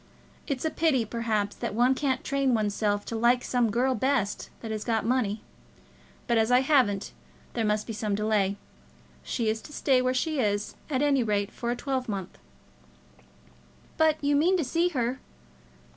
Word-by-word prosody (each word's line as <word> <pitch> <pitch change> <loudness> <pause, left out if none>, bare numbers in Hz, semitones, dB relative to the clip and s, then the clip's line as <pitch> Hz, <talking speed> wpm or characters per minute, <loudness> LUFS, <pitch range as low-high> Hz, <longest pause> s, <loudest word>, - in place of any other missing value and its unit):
It's 280 0 -2
a 315 - +1
pity, 305 -9 +2
perhaps, 215 -2 -1
that - - -4
one 245 +3 +4
can't 265 -1 -1
train 275 -2 +1
one's 210 -2 0
self 205 -1 0
to 230 - -5
like 240 +2 +3
some 245 -2 +1
girl 250 +5 +1
best 250 -4 0
that 225 - -5
has 215 -1 -3
got 225 -2 0
money; 225 -4 0 0.8
but 235 -2 +2
as 220 +1 +2
I 250 +1 +5
haven't, 255 -8 +2 0.4
there 230 - -1
must 210 0 0
be 225 - -5
some 210 -1 -1
delay. 205 -2 +1 0.6
She 230 - -2
is 220 +1 0
to - - -12
stay 270 -3 +2
where 255 0 +1
she 310 +2 0
is, 205 -3 0 0.2
at 275 -1 +1
any 280 -3 +3
rate, 205 -2 0
for 235 - -4
a 240 - 0
twelvemonth." 250 -8 -4 1.6
"But 315 -1 +4
you 285 0 +3
mean 350 +6 +3
to 335 - 0
see 335 +7 +1
her?" 255 -4 -1
240 Hz, 175 wpm, -27 LUFS, 215-265 Hz, 1.6 s, I